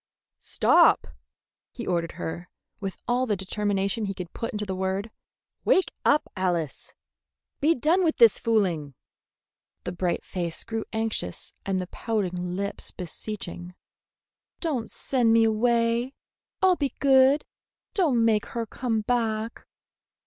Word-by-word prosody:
"Stop!" -, -, +4 dB, 0.6 s
he 235 Hz, -, -7 dB
ordered 170 Hz, -2 st, -1 dB
her, 175 Hz, +2 st, -6 dB, 0.3 s
with 195 Hz, -2 st, -4 dB
all 250 Hz, +1 st, +1 dB
the 210 Hz, -, +1 dB
determination 200 Hz, +2 st, -1 dB
he 195 Hz, -1 st, -3 dB
could 180 Hz, -2 st, -7 dB
put 230 Hz, -, -3 dB
into 210 Hz, 0 st, -3 dB
the 190 Hz, -, -3 dB
word. 190 Hz, +3 st, -2 dB, 0.5 s
"Wake 375 Hz, -, +3 dB
up, 295 Hz, -, +3 dB
Alice! 175 Hz, -5 st, -2 dB, 0.6 s
Be 315 Hz, +3 st, +3 dB
done 325 Hz, +8 st, +2 dB
with 320 Hz, -2 st, +1 dB
this 230 Hz, -3 st, +6 dB
fooling!" 175 Hz, -, 0 dB, 0.9 s
The -, -, -3 dB
bright 180 Hz, 0 st, -1 dB
face 170 Hz, -3 st, -4 dB
grew 225 Hz, -1 st, -4 dB
anxious 220 Hz, -, -2 dB
and 190 Hz, -1 st, +1 dB
the 185 Hz, -, -2 dB
pouting 180 Hz, -4 st, -2 dB
lips 200 Hz, +1 st, -3 dB
beseeching. 180 Hz, -1 st, -6 dB, 0.8 s
"Don't 280 Hz, -9 st, -2 dB
send 245 Hz, -4 st, +1 dB
me 230 Hz, 0 st, +6 dB
away! 235 Hz, +3 st, +2 dB, 0.5 s
I'll 375 Hz, -1 st, +6 dB
be 280 Hz, -4 st, -2 dB
good! 270 Hz, +1 st, +5 dB, 0.5 s
Don't 290 Hz, -, +3 dB
make 220 Hz, -1 st, +2 dB
her 235 Hz, -1 st, -3 dB
come 225 Hz, 0 st, -2 dB
back!" 225 Hz, -1 st, -1 dB
220 Hz, 130 wpm, -26 LUFS, 185-240 Hz, 0.9 s, this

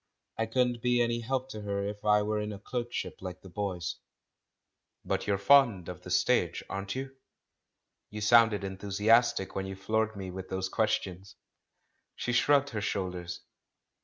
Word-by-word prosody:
I 115 Hz, -, +1 dB
couldn't 120 Hz, 0 st, +1 dB
be 125 Hz, 0 st, +2 dB
any 120 Hz, 0 st, +1 dB
help 130 Hz, +2 st, -2 dB
to 110 Hz, -5 st, -7 dB
her 100 Hz, -1 st, -2 dB
if 105 Hz, 0 st, -6 dB
I 105 Hz, 0 st, +4 dB
were 105 Hz, 0 st, -1 dB
in 105 Hz, 0 st, -3 dB
a 100 Hz, -, -6 dB
clerkship 120 Hz, +3 st, -4 dB
like 90 Hz, -1 st, -7 dB
the 95 Hz, -, -11 dB
boys. 90 Hz, -2 st, -3 dB, 1.1 s
"But -, -, -1 dB
you're 100 Hz, -1 st, +2 dB
fond 105 Hz, -5 st, +4 dB
of 90 Hz, -, -7 dB
the -, -, -10 dB
stage, -, -, +2 dB
aren't 100 Hz, +2 st, -4 dB
you? 135 Hz, +1 st, -5 dB, 1.0 s
lYou 105 Hz, 0 st, -6 dB
sounded 115 Hz, -2 st, +5 dB
enthusiastic 100 Hz, +2 st, +2 dB
when 95 Hz, 0 st, -3 dB
you 95 Hz, -, -6 dB
floored 110 Hz, +3 st, -1 dB
me 95 Hz, -2 st, -6 dB
with 95 Hz, 0 st, -7 dB
those 95 Hz, 0 st, -2 dB
questions." 95 Hz, -4 st, -1 dB, 0.8 s
She 120 Hz, -, -2 dB
slu*ugged 140 Hz, +3 st, +3 dB
her 105 Hz, -3 st, -3 dB
shoulders. 90 Hz, -4 st, -3 dB
105 Hz, 160 wpm, -30 LUFS, 95-120 Hz, 1.1 s, sounded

